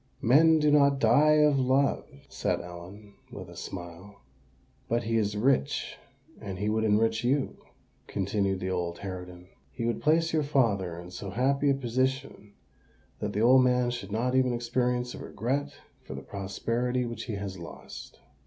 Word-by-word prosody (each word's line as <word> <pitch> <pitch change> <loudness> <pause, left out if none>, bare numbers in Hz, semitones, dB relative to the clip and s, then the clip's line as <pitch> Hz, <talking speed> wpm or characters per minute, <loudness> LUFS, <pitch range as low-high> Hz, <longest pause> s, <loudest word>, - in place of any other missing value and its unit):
"Men 160 +7 +6
do 150 -1 +3
not 140 -1 +5
die 150 +2 +5
of 145 -2 +4
love," 135 +2 +1 0.2
said - - -1
Ellen, 90 +4 -11 0.2
with 95 -6 -9
a - - -12
smile. 90 +3 -9 0.7
"But 120 +1 +1
he 115 +1 -1
is 105 -1 0
rich—and 135 -2 -2
he 105 +2 -1
would 110 +1 0
enrich 110 +1 +2
you," 135 +3 0 0.5
continued 100 -1 -1
the 95 +1 -2
old 85 -2 -2
harridan: 90 -2 -8 0.2
"he 115 - -4
would 120 - -1
place 165 +2 +2
your 155 - +3
father 105 - 0
in 90 +1 -10
so 100 +2 -6
happy 135 +7 +1
a 140 - +3
position 130 -3 -2 0.7
that 105 - -3
the 105 - 0
old 130 +3 +6
man 125 -1 +2
should 120 -5 -6
not 120 +4 0
even 130 -1 +3
experience 125 +1 -1
a - - -8
regret 140 +4 -3 0.3
for - - -9
the 70 - -7
prosperity 115 - -2
which 115 -1 -6
he 115 - -4
has 100 -2 -5
lost." 85 - -10
115 Hz, 160 wpm, -28 LUFS, 100-130 Hz, 0.7 s, Men